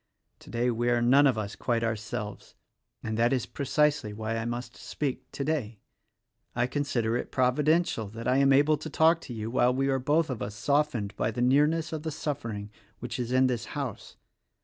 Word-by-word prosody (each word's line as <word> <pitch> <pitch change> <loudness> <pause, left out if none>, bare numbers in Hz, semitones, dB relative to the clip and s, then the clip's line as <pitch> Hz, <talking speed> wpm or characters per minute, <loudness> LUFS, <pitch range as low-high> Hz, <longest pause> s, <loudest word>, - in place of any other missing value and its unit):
Today, 120 +1 -1
we 120 +1 0
are 120 0 +3
none 135 +4 +5
of 130 -4 +1
us 105 -2 -4
quite 115 -2 -1
ourselves, 110 -1 -4 0.5
and 110 0 -3
that 120 +2 +3
is 130 -4 0
precisely 145 -5 0
why 110 +1 -3
I 115 0 -2
must 120 0 -5
speak 140 -4 -4
today. 140 -7 -2 0.8
I 120 0 +2
consider 125 -4 -1
it - - -5
providential 135 -1 +2
that 115 +3 -7
I 130 +1 +3
am 140 0 +4
able 145 +3 +4
to 155 +2 -7
talk 160 +3 +3
to 125 - -8
you 110 +1 -4
while 125 0 +3
we 135 +1 +1
are 135 -1 +1
both 150 +3 +1
of 120 - -5
us 100 +1 -4
softened 140 -5 0
by - - 0
the 120 +2 -2
near 140 +4 +5
ness 165 +1 -2
of 155 - -3
the 160 - -3
suffering 115 -9 -4 0.3
which 120 +1 -5
is 120 0 -3
in 130 +1 +4
this 125 -5 -1
house. - - -5
125 Hz, 195 wpm, -28 LUFS, 115-145 Hz, 0.8 s, none